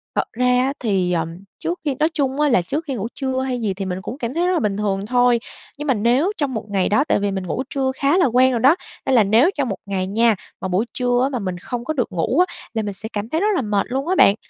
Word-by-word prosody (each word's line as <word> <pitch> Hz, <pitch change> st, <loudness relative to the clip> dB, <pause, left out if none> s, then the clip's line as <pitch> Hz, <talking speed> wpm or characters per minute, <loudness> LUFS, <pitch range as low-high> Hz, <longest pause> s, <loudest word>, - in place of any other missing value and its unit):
Thật -, -, 0 dB
ra 250 Hz, +2 st, 0 dB
á 250 Hz, +2 st, +2 dB
thì, 195 Hz, -6 st, 0 dB
ờm, 165 Hz, 0 st, -2 dB, 0.2 s
trước 345 Hz, +1 st, -3 dB
khi 285 Hz, -3 st, 0 dB
nói 310 Hz, -, +3 dB
chung 275 Hz, -2 st, -1 dB
á 295 Hz, -, +4 dB
là 235 Hz, -, +4 dB
trước 295 Hz, -, -3 dB
khi 275 Hz, -, -3 dB
ngủ 215 Hz, -1 st, -3 dB
trưa 265 Hz, -2 st, -2 dB
hay 255 Hz, -2 st, -2 dB
gì 210 Hz, -4 st, 0 dB
thì 195 Hz, +1 st, -5 dB
mình 185 Hz, 0 st, -3 dB
cũng 235 Hz, +6 st, -6 dB
cảm 240 Hz, -3 st, -4 dB
thấy 345 Hz, +3 st, +1 dB
rất 365 Hz, -, +2 dB
là 345 Hz, -, +2 dB
bình 205 Hz, -2 st, -1 dB
thường 200 Hz, -1 st, -1 dB
thôi, 245 Hz, +1 st, +3 dB, 0.4 s
nhưng 295 Hz, +1 st, -5 dB
mà 265 Hz, -, +4 dB
nếu 245 Hz, -, +2 dB
trong 285 Hz, -3 st, -1 dB
một 220 Hz, -2 st, -4 dB
ngày 195 Hz, -2 st, +1 dB
đó 240 Hz, +7 st, +3 dB
tại -, -, +2 dB
vì 200 Hz, -1 st, 0 dB
mình 190 Hz, -1 st, -4 dB
ngủ 255 Hz, -, -2 dB
trưa 265 Hz, -1 st, 0 dB
khá 280 Hz, +5 st, +2 dB
là 370 Hz, -, +4 dB
quen 255 Hz, +1 st, +4 dB
rồi 240 Hz, -, 0 dB
đó, 270 Hz, +7 st, +6 dB, 0.3 s
nên 265 Hz, -, +2 dB
là 225 Hz, -, +6 dB
nếu 225 Hz, -, +4 dB
trong 275 Hz, -4 st, 0 dB
một 195 Hz, -, -1 dB
ngày 190 Hz, -2 st, -2 dB
nha, 225 Hz, +3 st, +3 dB, 0.3 s
mà -, -, -2 dB
buổi 190 Hz, +5 st, +1 dB
trưa 245 Hz, -1 st, +1 dB
á 270 Hz, -, +2 dB
mà 255 Hz, -3 st, -3 dB
mình 185 Hz, -3 st, -3 dB
không 240 Hz, +6 st, -5 dB
có 310 Hz, -, -1 dB
được 250 Hz, -7 st, -1 dB
ngủ 185 Hz, -, 0 dB
á, 345 Hz, -, -12 dB, 0.2 s
là 225 Hz, -, 0 dB
mình 205 Hz, -1 st, -4 dB
sẽ 220 Hz, +3 st, -3 dB
cảm 210 Hz, +2 st, -3 dB
thấy 320 Hz, +5 st, 0 dB
rất 415 Hz, -, +2 dB
là -, -, +1 dB
mệt 210 Hz, -4 st, 0 dB
luôn 270 Hz, +4 st, -2 dB
á 370 Hz, -, +1 dB
bạn, 200 Hz, -, +6 dB
245 Hz, 300 wpm, -21 LUFS, 200-270 Hz, 0.4 s, đó